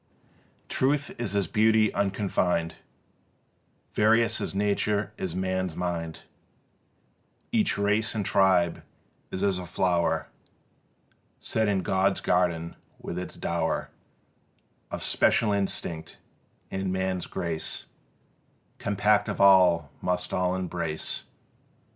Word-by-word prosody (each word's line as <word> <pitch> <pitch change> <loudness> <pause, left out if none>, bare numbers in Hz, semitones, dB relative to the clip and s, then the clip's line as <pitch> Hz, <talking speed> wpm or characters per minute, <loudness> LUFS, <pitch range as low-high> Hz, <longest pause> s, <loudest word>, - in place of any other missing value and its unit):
Truth 145 +2 +1
is 105 -5 -2
as 100 -1 +2
Beauty 110 +3 +3
unconfined: 95 -4 0 1.2
Various 110 +1 +3
as - - -4
Nature 105 +1 0
is 90 -2 -4
man's 95 -2 -1
Mind: 85 -2 -3 1.3
Each - - +2
race 100 +2 +1
and 105 -2 -1
tribe 90 -4 +3 0.5
is 95 - -3
as 95 -2 +1
a 90 - -6
flower 90 -1 +1 1.1
Set 110 -1 0
in 100 -2 +1
God's 95 +1 +1
garden 85 -2 0 0.2
with 85 - -5
its 90 - -7
dower - - -2 1.0
Of - - -4
special 105 - +3
instinct; 85 -5 -3 0.5
and 95 -1 -2
man's 95 -1 -1
grace 85 -3 -3 0.9
Compact 105 +1 +2
of - - -4
all 90 -6 +5
must 90 0 -1
all 90 0 +1
embrace. 90 -4 -3
95 Hz, 105 wpm, -27 LUFS, 90-100 Hz, 1.3 s, all